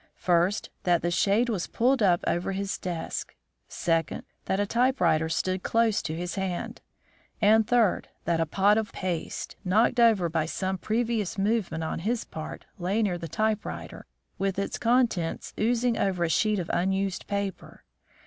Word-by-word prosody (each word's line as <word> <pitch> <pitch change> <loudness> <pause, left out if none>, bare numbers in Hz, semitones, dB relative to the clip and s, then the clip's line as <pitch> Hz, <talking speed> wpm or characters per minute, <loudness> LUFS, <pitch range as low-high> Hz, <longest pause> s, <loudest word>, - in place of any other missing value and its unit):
First, 180 +3 +1
that 175 -3 +2
the 175 - +1
shade 205 +7 +2
was 205 -7 -2
pulled 255 +2 +2
up 180 -4 +3
over 175 +3 0
his 195 +1 -3
desk; 175 -3 -4 0.3
second, 165 -3 -1 0.2
that 190 - 0
a 205 - +2
typewriter 235 - +2
stood 185 +3 -1
close 230 0 +2
to 155 - -4
his 175 +2 -4
hand; 190 -3 -3 0.6
and 220 +1 +5
third, 235 -6 +2 0.2
that 170 -1 +1
a 165 - +1
pot 200 +6 +3
of 220 - -4
paste, 180 -4 -4
knocked 215 +6 +3
over 220 -7 +5
by 160 -1 -1
some 190 +2 -2
previous 220 0 -1
movement 195 -5 0
on 160 - -3
his 225 +7 -1
part, 155 -1 -7
lay 195 +6 0
near 180 -4 0
the 165 - -5
typewriter, 215 +2 -3 0.3
with 195 -1 -1
its 200 - -2
contents 230 -8 +1
oozing 235 +2 +2
over 185 -3 +1
a 170 - +1
sheet 215 +5 +2
of 175 -3 -3
unused 190 +1 0
paper. 200 -1 -4
195 Hz, 160 wpm, -27 LUFS, 175-220 Hz, 0.6 s, and